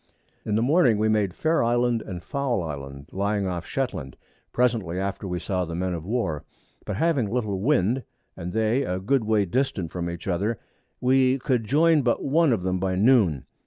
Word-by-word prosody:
In 105 - -1
the 110 - +2
Morning 130 -5 +4
we 110 +1 +1
made 105 -4 +1
Fair 160 -2 +1
Island 120 0 +1
and 90 -5 -7
Foul 135 -9 -1
Island 70 -2 -7
lying 100 +1 -1
off 90 -2 -3
of - - -13
Shetland, 100 - -3 0.3
presently 115 -8 0
after 100 0 -3
we 90 -1 -2
saw 95 -1 -1
the 85 -1 -5
Men 90 +1 -1
of 85 0 -6
War; 105 -10 -1 0.4
but 105 - -3
having 140 - +1
little 110 -5 -1
Wind, 125 0 +2 0.3
and 85 +1 -6
they 110 +5 +1
a 90 -8 -2
good 115 +5 +1
way 105 -2 +2
distant 95 - -1
from 85 -1 -3
each 85 +1 -7
other, 100 +5 0 0.4
we 130 +1 +3
could 125 -4 0
join 155 +5 +4
but 120 -2 0
one 155 +1 +3
of 105 -6 0
them 95 0 0
by 95 0 -1
Noon. 100 - +3
105 Hz, 195 wpm, -25 LUFS, 90-125 Hz, 0.4 s, Morning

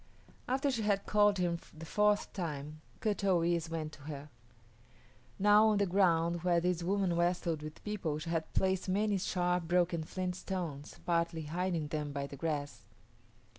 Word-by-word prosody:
After 270 +2 +1
she 235 -4 -1
had 205 -2 +1
called 205 -1 +4
him 175 -2 0 0.2
the 165 - -8
fourth 210 +4 +2
time, 155 -4 -5 0.2
Kut 210 -2 0
o 185 -3 +3
yis´ 170 -1 0
went 160 -2 -3
to 145 - -14
her. 145 -1 -7 1.1
Now 210 +2 +6
on 215 -1 +3
the 200 - +3
ground 175 -3 +2
where 175 -1 +3
this 175 0 0
woman 190 0 +1
wrestled 170 -2 0
with 155 0 -9
people 190 -8 -2
she 165 +2 -5
had 165 -1 -2
placed 190 0 +1
many 205 +1 +1
sharp, 180 -2 0
broken 175 -1 +2
flint 180 +2 -3
stones, 175 -6 -5
partly 170 -1 0
hiding 170 0 -2
them 150 -1 -3
by 140 0 -2
the 140 - -8
grass. 145 -1 -3
175 Hz, 170 wpm, -33 LUFS, 160-195 Hz, 1.1 s, Now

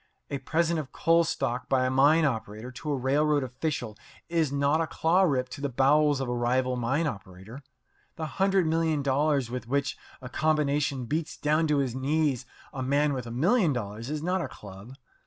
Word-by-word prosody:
A 140 - -2
present 165 +2 0
of 145 -3 -6
coal 165 +1 +3
stock 125 -6 -2
by 130 -1 +2
a 130 - 0
mine 145 +5 +4
operator 110 -2 -3
to 150 +4 -5
a 140 - 0
railroad 145 +3 +2
official 130 -3 -3 0.3
is 165 -4 +1
not 140 +3 +2
a 165 - -1
claw 170 +5 +2
rip 135 -8 +2
to 140 - -8
the 140 - -1
bowels 145 +3 +3
of 135 - -2
a 125 - -1
rival 125 +1 0
mine 130 +7 0
operator. 100 0 -7 0.5
The 160 - -4
hundred 195 +3 +1
million 160 -2 +1
dollars 140 -2 +1
with 125 -2 -5
which 140 +2 -1 0.2
a 125 - -8
combination 145 -2 0
beats 155 +5 -3
down 155 +2 +1
to 150 -1 +2
his 135 -4 0
knees 135 -1 0 0.3
a 135 - -4
man 145 +3 +1
with 125 -3 -4
a - - -6
million 170 - +2
dollars 115 0 -5
is 150 0 -3
not 180 +2 0
a 140 - -3
club. 105 0 -12
140 Hz, 195 wpm, -27 LUFS, 125-155 Hz, 0.5 s, mine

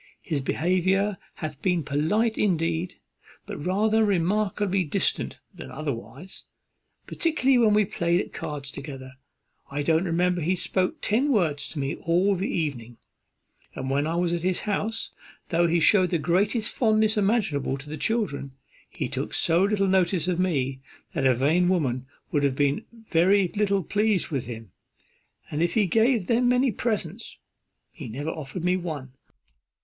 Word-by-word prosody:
His 150 -5 -2
behaviour 185 +6 +1 0.2
hath 155 -3 -6
been 180 -3 +1
polite 205 - +1
indeed, 170 -2 0 0.5
but - - -7
rather 215 +5 +2
remarkably 195 0 +1
distant 150 - -1
than - - -9
otherwise. 145 +4 -6 0.6
Particularly 270 -6 +2
when 215 -3 +4
we 210 -1 +4
played 170 -1 0
at - - -5
cards 140 -2 -5
together. 135 -3 -8 0.6
I 145 +1 -2
don't 160 +4 +2
remember 175 +1 +1
he 175 +4 +1
spoke 185 0 -1
ten 255 +7 +1
words 155 - +1
to 160 - -9
me 140 0 -1
all 180 +4 +2
the 190 +1 -2
evening; 120 -8 -3 0.8
and 130 0 -4
when 145 +2 +1
I 165 - -1
was 175 0 +1
at 170 - -1
his 185 +1 0
house, 210 +1 -2 0.4
though 170 0 +3
he 170 +1 +2
shewed 185 +3 +5
the 175 - +1
greatest 195 - +1
fondness 215 -2 +2
imaginable 195 - +1
to 140 +2 -10
the 150 - -5
children, 155 - -2 0.4
he - - -4
took - - -4
so 170 +2 +3
little 200 -1 +1
notice 185 -2 +2
of 180 -1 0
me, 135 -7 0 0.3
that 140 -6 +1
a 130 - +4
vain 160 +8 +2
woman 130 -8 0 0.2
would 145 - +1
have 140 -2 +1
been 145 0 +1
very 195 -4 +2
little 200 -2 +1
pleased 205 +2 +1
with 135 -7 -3
him. 115 -5 -8 0.8
And 150 - -1
if 170 - +1
he 215 -3 +4
gave 225 +2 +2
them 245 +3 +2
many 250 +1 +3
presents, 210 -2 -3 0.5
he 150 -8 -9
never 145 +8 -4
offered 155 +2 -6
me 180 +1 +3
one. 155 -7 -5
175 Hz, 160 wpm, -25 LUFS, 150-205 Hz, 0.8 s, shewed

